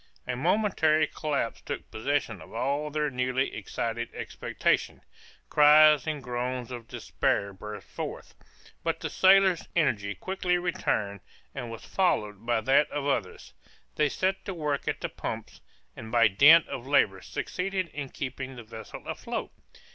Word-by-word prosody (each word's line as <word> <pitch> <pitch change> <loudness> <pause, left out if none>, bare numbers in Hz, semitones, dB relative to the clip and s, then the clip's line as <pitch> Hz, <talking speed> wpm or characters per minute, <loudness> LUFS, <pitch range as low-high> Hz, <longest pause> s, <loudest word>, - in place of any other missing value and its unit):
A 125 - -2
momentary 160 - +2
collapse 145 -8 -3
took - - -6
possession 115 - -1
of 80 - -12
all 140 +5 -1
their 150 -1 -1
newly 125 +1 0
excited 115 +3 -3
expectations; - - -1 0.4
cries 150 -1 +6
and 150 -3 -3
groans 125 0 -3
of 120 -2 -7
despair 100 0 -1
burst 105 +1 -8
forth, - - -7 0.5
but - - -1
the - - -4
sailors' 190 -2 +5
energy 105 - +1
quickly 180 - -1
returned, 105 - -1 0.3
and 125 -4 -5
was 115 - -8
followed 110 - 0
by 120 -2 +2
that 135 +5 +3
of 145 - -3
the 140 - +2
others; 90 - -4 0.4
they 150 -1 +2
set 190 +6 -1
to 190 - -4
work 150 -4 -2
at - - -2
the - - -2
pumps, - - -6 0.3
and 110 0 -9
by 115 -2 +6
dint 150 - +7
of 130 0 -6
labor 100 -9 +3
succeeded 185 - -3
in 140 -2 -6
keeping 130 0 -5
the 120 - -9
vessel 110 -1 -10
afloat. - - -4
135 Hz, 150 wpm, -28 LUFS, 115-155 Hz, 0.5 s, dint